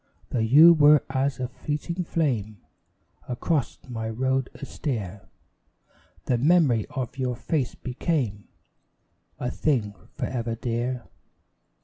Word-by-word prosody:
Though 125 Hz, -, 0 dB
you 145 Hz, +10 st, +8 dB
were 150 Hz, -2 st, +6 dB
as 135 Hz, +1 st, 0 dB
a 125 Hz, -, -1 dB
fleeting 155 Hz, +7 st, -4 dB
flame 120 Hz, -12 st, -1 dB, 0.7 s
Across 135 Hz, +3 st, -1 dB
my 115 Hz, -3 st, -4 dB
road 130 Hz, +3 st, 0 dB
austere, 110 Hz, -, -5 dB, 1.0 s
The 125 Hz, -2 st, +1 dB
memory 140 Hz, -, +3 dB
of 130 Hz, -1 st, -5 dB
your 125 Hz, -1 st, -1 dB
face 130 Hz, +2 st, -2 dB
became 125 Hz, -5 st, -2 dB, 0.9 s
A 125 Hz, -, -2 dB
thing 120 Hz, -9 st, 0 dB, 0.2 s
for -, -, -4 dB
ever 115 Hz, -2 st, -3 dB
dear. 120 Hz, +1 st, -2 dB
125 Hz, 110 wpm, -25 LUFS, 115-145 Hz, 1.0 s, you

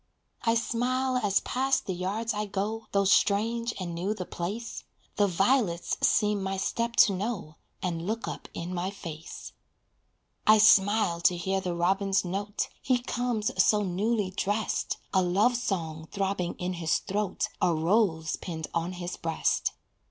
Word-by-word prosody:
I 230 Hz, 0 st, +2 dB
smile 255 Hz, +3 st, 0 dB
as 205 Hz, -5 st, +2 dB
past 265 Hz, +1 st, 0 dB
the 190 Hz, -, -2 dB
yards 200 Hz, +6 st, -2 dB
I 210 Hz, 0 st, -2 dB
go, 210 Hz, +3 st, -3 dB
Though 200 Hz, 0 st, +2 dB
strange 230 Hz, +4 st, +2 dB
and 175 Hz, -2 st, -4 dB
new 185 Hz, +6 st, -2 dB
the 185 Hz, -, -5 dB
place, 205 Hz, +9 st, -5 dB, 0.3 s
The 205 Hz, -, +4 dB
violets 195 Hz, -1 st, +1 dB
seem 210 Hz, -1 st, +3 dB
my 190 Hz, 0 st, -2 dB
step 235 Hz, +4 st, -1 dB
to 200 Hz, -, +5 dB
know, 190 Hz, -5 st, -4 dB, 0.3 s
And 170 Hz, -1 st, -2 dB
look 225 Hz, +2 st, -2 dB
up -, -, -6 dB
in 175 Hz, +2 st, -4 dB
my 180 Hz, +1 st, -1 dB
face. 165 Hz, -5 st, -8 dB, 1.0 s
I 215 Hz, 0 st, +8 dB
smile 205 Hz, -4 st, +5 dB
to 175 Hz, 0 st, +3 dB
hear 190 Hz, +3 st, -1 dB
the 180 Hz, -2 st, -2 dB
robin's 195 Hz, +3 st, +1 dB
note. 200 Hz, +3 st, -2 dB
He 255 Hz, -1 st, +2 dB
comes 240 Hz, -3 st, -1 dB
so 210 Hz, -1 st, +3 dB
newly 200 Hz, +2 st, 0 dB
dressed, 205 Hz, +3 st, -1 dB, 0.2 s
A 190 Hz, -, +4 dB
love 195 Hz, +7 st, +3 dB
song 165 Hz, -9 st, -3 dB
throbbing 195 Hz, -3 st, -1 dB
in 180 Hz, +1 st, -3 dB
his 160 Hz, -, +2 dB
throat, 200 Hz, -1 st, -2 dB
A 180 Hz, -, +4 dB
rose 165 Hz, -1 st, +1 dB
pinned 160 Hz, -3 st, -5 dB
on 170 Hz, +2 st, -1 dB
his 175 Hz, 0 st, -5 dB
breast. 165 Hz, -1 st, 0 dB
195 Hz, 155 wpm, -28 LUFS, 180-220 Hz, 1.0 s, I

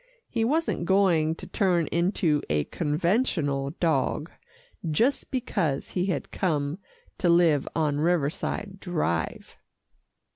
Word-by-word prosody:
He 230 Hz, -2 st, -1 dB
wasn't 295 Hz, -, 0 dB
going 175 Hz, -5 st, +3 dB
to -, -, -9 dB
turn 180 Hz, -5 st, +1 dB
into 170 Hz, -3 st, +1 dB
a 75 Hz, 0 st, +2 dB
conventional 155 Hz, -, 0 dB
dog, 155 Hz, -1 st, 0 dB, 0.6 s
just 235 Hz, -, +1 dB
because 195 Hz, -, -1 dB
he 180 Hz, +1 st, -1 dB
had 185 Hz, -, -2 dB
come 150 Hz, -2 st, -1 dB, 0.4 s
to 175 Hz, -, +2 dB
live 170 Hz, -5 st, +4 dB
on 150 Hz, -3 st, +1 dB
Riverside 175 Hz, +4 st, -1 dB
Drive. 155 Hz, -, -2 dB
170 Hz, 110 wpm, -26 LUFS, 150-190 Hz, 0.6 s, live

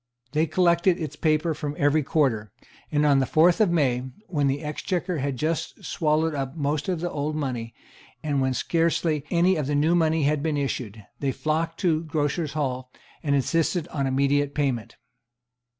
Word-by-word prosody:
They 155 Hz, +2 st, +1 dB
collected 170 Hz, +2 st, +3 dB
its 155 Hz, -3 st, -4 dB
paper 155 Hz, +1 st, +1 dB
from 145 Hz, -1 st, -4 dB
every 145 Hz, +2 st, +3 dB
quarter; 130 Hz, -, 0 dB, 0.4 s
and 150 Hz, 0 st, +2 dB
on 140 Hz, -2 st, +5 dB
the 130 Hz, -, +1 dB
fourth 170 Hz, +6 st, +4 dB
of 210 Hz, -, +4 dB
May, 135 Hz, -8 st, +2 dB, 0.2 s
when 145 Hz, -8 st, 0 dB
the 140 Hz, +3 st, -1 dB
Exchequer 170 Hz, +3 st, -2 dB
had 135 Hz, -1 st, -2 dB
just 160 Hz, +4 st, -3 dB
swallowed 155 Hz, 0 st, +1 dB
up 135 Hz, 0 st, -3 dB
most 145 Hz, +2 st, -1 dB
of 175 Hz, -3 st, -1 dB
the 175 Hz, -, -2 dB
old 150 Hz, +1 st, -2 dB
money, 125 Hz, -6 st, -3 dB, 0.5 s
and 145 Hz, -3 st, 0 dB
when 130 Hz, -1 st, +1 dB
scarcely 165 Hz, -2 st, +1 dB
any 180 Hz, +1 st, +3 dB
of 150 Hz, -3 st, -2 dB
the 145 Hz, -, 0 dB
new 155 Hz, +4 st, +3 dB
money 160 Hz, -2 st, +2 dB
had 145 Hz, 0 st, +1 dB
been 155 Hz, -1 st, -1 dB
issued, 115 Hz, -7 st, -3 dB
they 140 Hz, -2 st, 0 dB
flocked 160 Hz, +3 st, -2 dB
to 160 Hz, -4 st, +2 dB
Grocers' 150 Hz, 0 st, -1 dB
Hall, 130 Hz, -4 st, -2 dB, 0.3 s
and 140 Hz, -2 st, +1 dB
insisted 165 Hz, +4 st, +1 dB
on 140 Hz, -3 st, -1 dB
immediate 140 Hz, +1 st, +1 dB
payment. 135 Hz, -6 st, -1 dB
150 Hz, 175 wpm, -25 LUFS, 140-165 Hz, 0.5 s, on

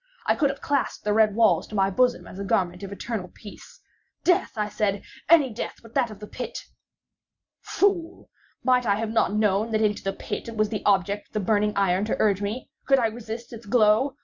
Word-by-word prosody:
I -, -, +3 dB
could 290 Hz, -4 st, +2 dB
have 275 Hz, -, -5 dB
clasped 285 Hz, -1 st, -1 dB
the 210 Hz, -, +1 dB
red 215 Hz, -1 st, +3 dB
walls 225 Hz, -1 st, +3 dB
to 215 Hz, -, -8 dB
my 195 Hz, -1 st, +2 dB
bosom 250 Hz, +4 st, +1 dB
as 190 Hz, -, -10 dB
a -, -, -3 dB
garment 180 Hz, -2 st, 0 dB
of 200 Hz, -1 st, -7 dB
eternal 200 Hz, -1 st, -4 dB
peace. 205 Hz, +3 st, -14 dB, 0.4 s
"Death," 360 Hz, -3 st, +2 dB
I 210 Hz, -1 st, -1 dB
said, 205 Hz, -1 st, -1 dB, 0.3 s
"any 295 Hz, -8 st, +5 dB
death 225 Hz, -, -5 dB
but 230 Hz, 0 st, -15 dB
that 255 Hz, -4 st, +1 dB
of 215 Hz, -, -10 dB
the 210 Hz, -, -8 dB
pit!" 250 Hz, +4 st, -6 dB, 1.0 s
Fool! 370 Hz, -4 st, -1 dB, 0.4 s
might 250 Hz, -2 st, +3 dB
I 200 Hz, -, +3 dB
have 220 Hz, +1 st, -3 dB
not 225 Hz, -, +2 dB
known 210 Hz, +1 st, +1 dB
that 215 Hz, -, +2 dB
into 210 Hz, -1 st, +1 dB
the 195 Hz, -, -1 dB
pit -, -, -6 dB
it 225 Hz, -, -8 dB
was 215 Hz, 0 st, +2 dB
the 215 Hz, -1 st, -4 dB
object 200 Hz, +1 st, +1 dB
of -, -, -40 dB
the 215 Hz, -, 0 dB
burning 210 Hz, +1 st, +1 dB
iron 195 Hz, 0 st, +2 dB
to 215 Hz, -, -1 dB
urge 205 Hz, -2 st, +2 dB
me? 215 Hz, +5 st, -4 dB, 0.2 s
Could 270 Hz, 0 st, +5 dB
I 245 Hz, -, +2 dB
resist 230 Hz, +1 st, -8 dB
its 230 Hz, -1 st, -10 dB
glow? 225 Hz, +4 st, +3 dB
215 Hz, 220 wpm, -25 LUFS, 205-240 Hz, 1.0 s, any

